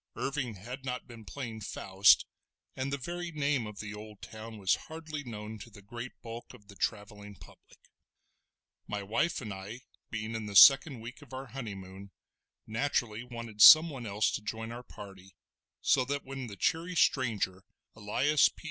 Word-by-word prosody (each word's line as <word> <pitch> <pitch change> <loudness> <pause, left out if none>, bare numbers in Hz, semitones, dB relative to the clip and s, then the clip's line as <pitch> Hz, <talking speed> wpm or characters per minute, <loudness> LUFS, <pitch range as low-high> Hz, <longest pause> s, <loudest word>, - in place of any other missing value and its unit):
Irving 135 -5 -2
had 125 +8 -8
not 125 -1 -4
been 115 -3 -12
playing 115 -3 -6
Faust, 100 -1 +4 0.5
and 130 +1 -3
the 140 - -1
very 175 +5 -5
name 145 -6 0
of 105 -1 -9
the 105 -1 -6
old 105 -1 -10
town 110 0 -9
was 95 -3 +2 0.2
hardly 155 -2 -6
known 110 -3 -7
to 115 - -10
the 100 -2 -15
great 120 +4 -8
bulk 115 0 -8
of 105 0 -20
the 100 - -12
travelling 105 -1 -4
public. - - -18 1.1
My 105 -1 -3
wife 150 +13 0
and 105 -5 -5
I 100 +6 -8 0.3
being 110 0 -4
in 110 -2 -4
the 100 - -7
second 135 +2 +8
week 120 +6 -9
of 135 -3 -15
our 130 +1 -5
honeymoon, 100 -6 -8 0.6
naturally 115 -1 -1
wanted 115 -3 -7
someone 155 -6 +9
else 105 +1 +1
to - - -3
join 110 +2 -5
our 120 +1 -7
party, 95 -5 -12 0.5
so 130 - +3
that 140 +2 -3
when 135 -1 -6
the 100 - -8
cheery 170 - 0
stranger, 110 - +1 0.3
Elias 130 +8 +3
P. - - -25
115 Hz, 170 wpm, -31 LUFS, 105-135 Hz, 1.1 s, someone